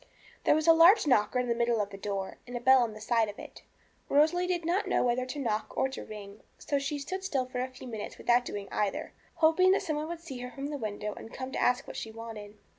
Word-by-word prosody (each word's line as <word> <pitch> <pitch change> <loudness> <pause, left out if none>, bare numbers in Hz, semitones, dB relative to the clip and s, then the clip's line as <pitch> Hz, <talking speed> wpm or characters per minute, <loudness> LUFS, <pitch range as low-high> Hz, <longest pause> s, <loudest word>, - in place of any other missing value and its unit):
There - - +5
was 310 0 0
a 330 - +8
large 340 +6 +7
knocker 250 -4 +3
in 250 0 0
the 235 - +2
middle 235 -1 +1
of 205 -1 -2
the - - -7
door, 195 -1 -4
and 245 0 -4
a - - -4
bell 260 +1 +6
on 235 -2 0
one 215 - -11
side 225 -1 +2
of 205 - -9
it. - - -11 0.5
Rosalie 320 +5 +3
did 350 -2 -1
not 360 +5 +1
know - - +2
whether 250 +1 0
to 275 - -5
knock 225 -6 -2
or 265 - +2
to 265 - -7
ring, 205 -1 -10 0.2
so 285 - -1
she 275 +2 -2
stood 375 +7 -5
still 270 -9 0
for 250 0 -5
a 255 - -1
few 260 0 -12
minutes 220 -3 -6
without 245 +1 +3
doing 205 -4 -6
either, 205 -2 -2 0.2
hoping 355 +4 +5
that 395 - +1
some 310 -5 -2
one 305 +1 -3
would 340 0 -5
see 275 -7 -8
her 250 0 -5
from 275 +3 -6
the 290 - -3
window 210 -2 -4
and 225 - -11
come 260 0 -6
to - - -2
ask 250 0 +2
what - - -8
she 225 - -5
wanted. 220 -2 -9
250 Hz, 270 wpm, -30 LUFS, 220-300 Hz, 0.5 s, a